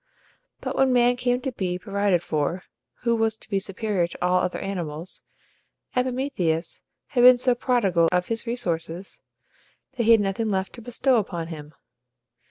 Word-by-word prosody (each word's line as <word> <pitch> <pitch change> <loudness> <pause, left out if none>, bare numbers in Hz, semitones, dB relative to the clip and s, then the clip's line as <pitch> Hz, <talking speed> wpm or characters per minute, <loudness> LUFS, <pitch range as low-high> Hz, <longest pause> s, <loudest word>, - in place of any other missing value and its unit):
But - - -4
when 265 -1 +3
man 245 0 +4
came 245 0 0
to 265 - -3
be 185 -6 -2
provided 200 -2 0
for, 155 +3 -1 0.4
who 235 -1 +2
was 225 -1 +1
to - - -4
be 200 -2 0
superior 195 -2 0
to - - -11
all 180 0 +3
other 180 - 0
animals, 175 -3 -4 0.7
Epimetheus 250 - -1 0.3
had 245 - +1
been 250 0 +9
so 250 0 +3
prodigal 200 -10 +2
of 180 0 +1
his 230 +1 -2
resources 180 -6 -3 0.7
that 250 -4 -2
he 230 - +5
had 225 - +6
nothing 205 +3 -1
left 190 -1 -1
to 240 - -10
bestow 250 +2 +1
upon 175 -6 -3
him. 150 -2 -9
200 Hz, 165 wpm, -24 LUFS, 180-245 Hz, 0.7 s, been